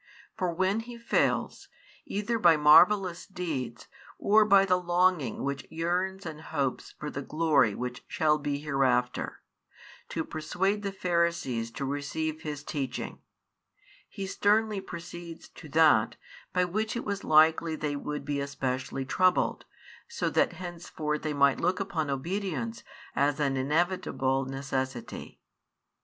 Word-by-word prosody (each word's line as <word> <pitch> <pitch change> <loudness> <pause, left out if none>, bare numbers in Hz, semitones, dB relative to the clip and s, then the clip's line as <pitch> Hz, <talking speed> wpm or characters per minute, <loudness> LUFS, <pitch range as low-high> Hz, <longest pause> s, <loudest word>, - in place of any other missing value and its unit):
For 185 -5 -1
when 190 +5 +1
He 235 +1 -8
fails, 235 - 0 0.4
either 210 +3 -1
by 170 -5 +6
marvellous 175 +4 +5
deeds 155 - -4 0.3
or 215 +1 +4
by 195 -2 +6
the 180 -1 +2
longing 175 -7 +1
which 140 -1 -3
yearns 180 +4 -2
and 155 -2 -6
hopes 140 -5 -3
for 150 -1 -5
the 140 - -4
glory 145 -7 +2
which 125 0 -5
shall 155 -2 +2
be 145 -1 -2
hereafter, 135 -4 0 0.7
to 160 - -2
persuade 190 +6 -1
the 200 -1 -3
Pharisees 170 -11 0
to 140 - -4
receive 150 +3 -3
His 150 -2 -5
teaching; 135 -5 -4 0.9
He 195 - -5
sternly 210 +1 +2
proceeds 170 -2 -9
to 155 - -13
that, 150 -8 +4 0.4
by 180 0 +2
which 215 +6 -2
it 235 - -3
was 200 -1 -3
likely 160 +1 +4
they 150 -2 -2
would 150 0 -4
be 145 0 -1
especially 135 -1 -3
troubled, 185 +6 +2 0.4
so 470 - -2
that - - +2
henceforth 165 -4 -4
they 155 -1 -2
might 140 -1 +3
look 180 +3 +1
upon 175 -7 -2
obedience 140 - -3 0.3
as 145 +1 +2
an 140 -2 +1
inevitable 135 -2 0
necessity. 130 -2 -4
160 Hz, 135 wpm, -29 LUFS, 140-185 Hz, 0.9 s, by